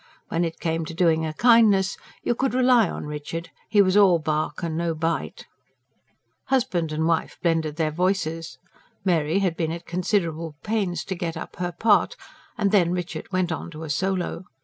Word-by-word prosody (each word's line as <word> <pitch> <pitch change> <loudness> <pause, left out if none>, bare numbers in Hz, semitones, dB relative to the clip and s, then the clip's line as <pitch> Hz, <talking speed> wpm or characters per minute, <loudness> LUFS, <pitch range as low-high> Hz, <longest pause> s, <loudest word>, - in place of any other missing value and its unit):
When 165 +1 0
it 165 -1 -3
came 165 0 -1
to 165 - -7
doing 160 -2 +2
a 155 - -4
kindness, 210 -4 +5 0.3
you - - +1
could 260 +1 -1
rely 250 -6 +4
on - - -5
Richard; 150 +3 -6 0.2
he 205 -2 +5
was 185 0 +1
all 195 -4 +6
bark 155 +2 -2
and 165 -2 -2
no 165 0 -1
bite. 165 +1 -2 1.0
Husband 180 -11 0
and 155 +1 -1
wife 165 -1 0
blended 160 -3 +1
their 155 -1 0
voices 165 -1 -1 0.5
Mary 165 -2 +2
had 185 -4 +1
been 160 -1 -1
at 170 +1 -6
considerable 170 -3 -1
pains 205 -5 -1
to 190 - -3
get 170 -2 -4
up - - -8
her 175 0 -2
part 205 +4 +3 0.4
and 200 - +1
then 180 -5 +4
Richard 180 +2 -4
went 185 -2 0
on 160 - -4
to 160 -1 -9
a 155 - -4
solo. 185 +1 -1
170 Hz, 180 wpm, -24 LUFS, 160-195 Hz, 1.0 s, all